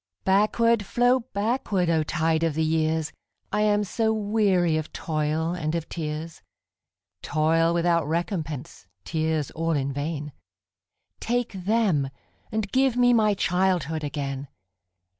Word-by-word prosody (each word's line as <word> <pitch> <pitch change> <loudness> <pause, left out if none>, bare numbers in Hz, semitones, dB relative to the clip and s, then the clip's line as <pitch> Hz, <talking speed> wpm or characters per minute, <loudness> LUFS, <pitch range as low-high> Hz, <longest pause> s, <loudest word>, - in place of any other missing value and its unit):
Backward, 215 +3 +3
flow 245 +5 +3
backward, 205 -3 0
O 160 -1 +3
tide 160 +1 0
of 165 -3 0
the 160 - +1
years!I 160 +5 -2
am 210 0 +3
so 220 +3 0
weary 205 -6 +2
of 155 -1 -3
toil 155 +1 -1
and 160 -2 -2
of 165 -1 -3
tears,—Toil 160 0 -3
without 170 -2 +1
recompense, 160 - -3 0.2
tears 160 -3 -1
all 165 0 -1
in 140 -2 -1
vain,—Take 145 - -6
them, 190 -7 +1 0.4
and 215 -2 -2
give 260 -2 +2
me 245 0 +5
my 215 -3 +3
childhood 180 -4 0
again! 140 -1 -4
165 Hz, 115 wpm, -25 LUFS, 155-205 Hz, 0.4 s, me